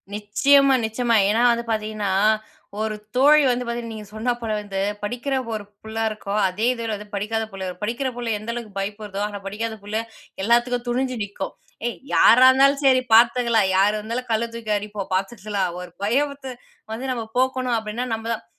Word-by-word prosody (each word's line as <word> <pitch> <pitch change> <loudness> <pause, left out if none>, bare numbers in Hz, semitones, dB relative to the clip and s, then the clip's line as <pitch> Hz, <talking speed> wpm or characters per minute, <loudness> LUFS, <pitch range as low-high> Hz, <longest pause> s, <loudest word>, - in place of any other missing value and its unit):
நிச்சயமா, 270 +7 +4
நிச்சயமா. 230 +1 0
ஏனா 220 +3 +2
வந்து 235 0 -1
பாத்தீங்கன்னா, 215 -2 -2 0.7
ஒரு 220 -1 -1 0.2
தோழி 290 +4 +6
வந்து 250 0 0
பார்த்தீங்கன்னா 235 -1 -4
நீங்க 215 -1 -8
சொன்ன 230 +3 0
போல 225 -2 -3
வந்து 200 -2 -5 0.2
படிக்கிற 245 +6 -3 0.2
ஒரு 215 -1 -4 0.2
புள்ள 220 0 -8
இருக்கும். 210 -1 -3
அதே 195 +5 -2
இதுல 230 -2 -4
வந்து 210 +1 -9
படிக்காத 220 +3 -1
புள்ள. 195 -1 -6 0.2
படிக்கற 240 +5 -1
புள்ள 240 -1 -4
எந்த 220 +3 -5
அளவுக்கு 225 -4 -7
பயப்படுதோ, 205 0 -4
ஆனா 205 -1 -7
படிக்காத 220 +3 -4
புள்ள 205 +2 -4 0.5
எல்லாத்துக்கும் 240 +2 +2
துணிஞ்சு 255 +1 -1
நிக்கும். 200 -1 -6 0.3
"ஏய் 240 - -4 0.2
யாரா 255 +1 +7
இருந்தாலும் 275 +2 +3
சரி 260 -1 +5
பார்த்துக்கலாம். 235 -2 +4
யார் 205 +2 +3
இருந்தாலும் 230 +4 -4
கல்ல 225 +1 +1
தூக்கி 225 -2 -3
அடிப்போம், 205 -1 -6
பாத்துக்கலாம்." 195 0 -2
ஒரு 180 - -9
பயத்த 270 +3 -1 0.4
வந்து 260 +4 -3
நம்ம 235 -3 -3
போக்கணும் 255 -1 +1
அப்டின்னா 220 +3 -4
நம்ம 225 0 -4
தான். 215 - -7
225 Hz, 170 wpm, -23 LUFS, 210-245 Hz, 0.7 s, யாரா